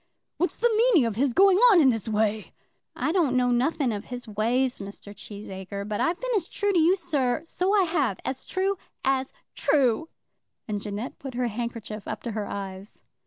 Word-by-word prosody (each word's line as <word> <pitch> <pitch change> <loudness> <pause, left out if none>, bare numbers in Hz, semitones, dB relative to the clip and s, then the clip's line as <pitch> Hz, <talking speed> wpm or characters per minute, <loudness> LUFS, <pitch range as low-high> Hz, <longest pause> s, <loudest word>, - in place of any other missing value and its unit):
"What's 355 - -1
the 475 -1 +2
meaning 435 - +4
of 225 -3 -2
his 265 +3 +2
going 385 +6 +5
on 390 -6 +7
in 280 -5 +6
this 225 -4 -1
way?" 215 -1 0 0.4
"I - - 0
don't 315 -8 +2
know 250 -1 +2
nothing 255 0 +1
of 205 +1 -5
his 245 -1 -7
ways, 240 +5 0
Mr. 200 +1 -9
Cheesacre; 200 -1 -7
but 210 -1 -2
I've 340 +2 +1
been - - -3
as 365 -5 0
true 410 -1 -1
to 355 - +4
you, 335 +4 +5
sir; 310 -6 -1
so 370 +4 0
I - - +5
have; 290 - 0
as 260 - -3
true 385 0 -1 0.3
as 265 0 +1 0.2
true." 280 +1 +2 0.6
And 205 -2 -3
Jeannette 210 +4 -5
put 270 -3 -7
her 245 -1 0
handkerchief 225 -2 -5
up - - -5
to 235 - -3
her 210 -1 -3
eyes. 195 0 -7
250 Hz, 195 wpm, -26 LUFS, 215-330 Hz, 0.6 s, on